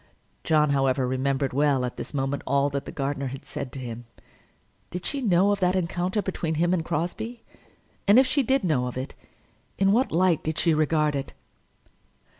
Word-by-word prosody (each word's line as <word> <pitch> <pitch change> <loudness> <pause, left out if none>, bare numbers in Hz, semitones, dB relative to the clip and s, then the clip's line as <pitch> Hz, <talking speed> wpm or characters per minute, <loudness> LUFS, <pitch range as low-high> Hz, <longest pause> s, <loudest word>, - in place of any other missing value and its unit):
John, 150 -2 +3
however, 135 -2 +2
remembered 135 +1 -1
well, 140 -2 +2
at 125 - -5
this - - -6
moment, 135 0 -2
all 140 +1 +2
that 140 0 -3
the - - -5
gardener 140 0 -2
had 135 +1 -7
said 130 - -5
to 135 - -6
him. 120 -1 -7 0.8
Did 180 0 -6
she 280 - -2
know 195 -3 +3
of 205 - 0
that 180 -1 +2
encounter 180 +3 -1
between 165 -4 -2
him 175 +3 +2
and 170 -3 0
Crosbie? 220 +10 -3 0.6
and 205 +3 +7
if 265 - +7
she 280 +2 +1
did 265 0 +1
know 140 -8 +1
of 125 - -6
it, 130 +2 -5 0.6
in 195 0 +3
what 245 +6 +2
light 175 -1 +2
did 155 0 -2
she 165 - +3
regard 155 -1 +2
it? 135 - -5
155 Hz, 190 wpm, -26 LUFS, 135-185 Hz, 0.8 s, and